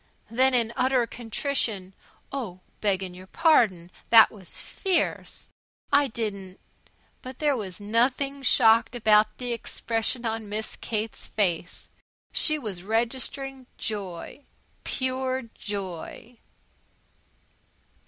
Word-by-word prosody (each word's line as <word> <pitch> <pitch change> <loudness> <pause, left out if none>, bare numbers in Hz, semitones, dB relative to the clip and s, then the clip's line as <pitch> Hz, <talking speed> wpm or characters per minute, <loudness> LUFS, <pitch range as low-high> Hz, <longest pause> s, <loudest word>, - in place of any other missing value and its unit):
Then 260 +2 +4
in 235 -1 +1
utter 255 -1 +3
contrition: 225 -4 -1 0.4
"Oh, 215 -10 -5 0.2
beggin' 190 -3 0
your 185 +1 -12
pardon! 210 - +3 0.2
That 225 -1 +9
was 195 -5 -8
fierce! 375 -3 -1 0.4
I 285 0 +6
didn't 200 -5 -4 0.3
" - - -37
But 255 0 -8
there 295 -2 +2
was 195 -6 -5
nothing 250 +6 +1
shocked 230 -2 +5
about 215 -2 +4
the 245 -1 -2
expression 230 +1 -2
on 225 -2 -2
Miss 215 +1 -3
Kate's 220 -1 -4
face. 175 -5 -1 0.4
She 310 -1 +2
was 210 -10 -5
registering 255 +5 -2
joy 200 +5 -5 0.4
pure 260 0 -1
joy. 205 +4 -6
225 Hz, 105 wpm, -26 LUFS, 205-260 Hz, 0.4 s, That